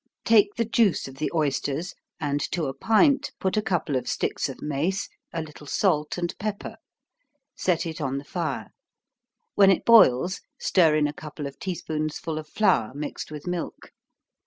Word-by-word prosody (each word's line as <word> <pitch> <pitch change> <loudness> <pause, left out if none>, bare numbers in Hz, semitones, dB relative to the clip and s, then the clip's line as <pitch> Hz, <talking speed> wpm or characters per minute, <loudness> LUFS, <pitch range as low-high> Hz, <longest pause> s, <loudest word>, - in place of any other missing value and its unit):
_ - - -62
Take 210 -2 +5
the 230 - 0
juice 220 -7 +2
of 135 0 -11
the 155 - -2
oysters, 150 +1 -1 0.3
and 145 -2 -1
to 170 -3 0
a 135 - -3
pint 245 - +3
put 190 - 0
a 215 - +2
couple 175 -8 -1
of 130 - -2
sticks - - -1
of - - -8
mace, 155 +7 -1 0.2
a 165 -1 -3
little 150 -1 -12
salt 150 -3 +1
and 175 -1 -2
pepper. 205 0 -4 0.8
Set 175 -3 0
it 160 -1 -5
on 135 -1 -1
the 140 - -5
fire 155 -2 -4 0.8
when 195 -1 +6
it 190 - +2
boils, 185 - +5 0.2
stir 165 -5 +3
in 150 -1 +3
a 145 - -1
couple 150 -1 -8
of 140 0 -8
tea 185 -2 -3
spoonsful 155 0 -3
of 155 - -9
flour, 175 - +2
mixed 150 +1 -5
with 150 -1 -8
milk. 180 -1 -5
160 Hz, 180 wpm, -25 LUFS, 150-190 Hz, 0.8 s, when